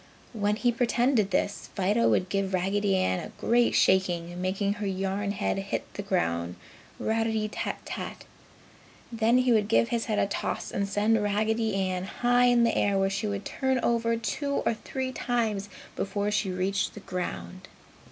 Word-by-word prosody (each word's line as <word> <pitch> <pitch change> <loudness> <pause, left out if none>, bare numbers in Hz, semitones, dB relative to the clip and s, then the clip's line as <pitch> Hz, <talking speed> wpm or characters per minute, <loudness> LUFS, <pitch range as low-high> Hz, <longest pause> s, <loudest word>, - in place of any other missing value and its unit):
When 210 -2 +1
he 240 +2 +2
pretended 240 -2 +2
this, 200 +1 -1
Fido 205 +4 +2
would 185 - +2
give 195 0 -1
Raggedy 195 +2 +1
Ann 185 -1 +1
a - - -9
great 240 +1 +3
shaking, 175 -2 +2
making 195 +2 0
her 205 - -1
yarn 195 +1 -2
head 200 -1 -1
hit 195 0 -3
the - - -4
ground 90 - -1 0.4
"ratty 220 -1 0
tat 210 - -4
tat." - - -6 0.9
Then 230 +1 +3
he 255 -1 +3
would 215 -3 +3
give 230 +1 +3
his 235 -1 -1
head 215 -3 -1
a - - +3
toss 200 - -3
and 200 0 -1
send 210 +2 +2
Raggedy 215 +1 0
Ann 185 -1 -1
high 245 +4 +2
in 245 -1 +5
the 230 - +2
air 200 -1 +2
where 195 0 +2
she 200 +2 -2
would 200 -1 -3
turn 265 -1 0
over 230 -1 +1
two 280 +5 -2
or - - +3
three 260 +3 -4
times 220 -6 -1 0.3
before 205 +1 -1
she 205 -1 0
reached 190 +2 -1
the 210 - -8
ground. 95 - -5
205 Hz, 170 wpm, -28 LUFS, 195-230 Hz, 0.9 s, in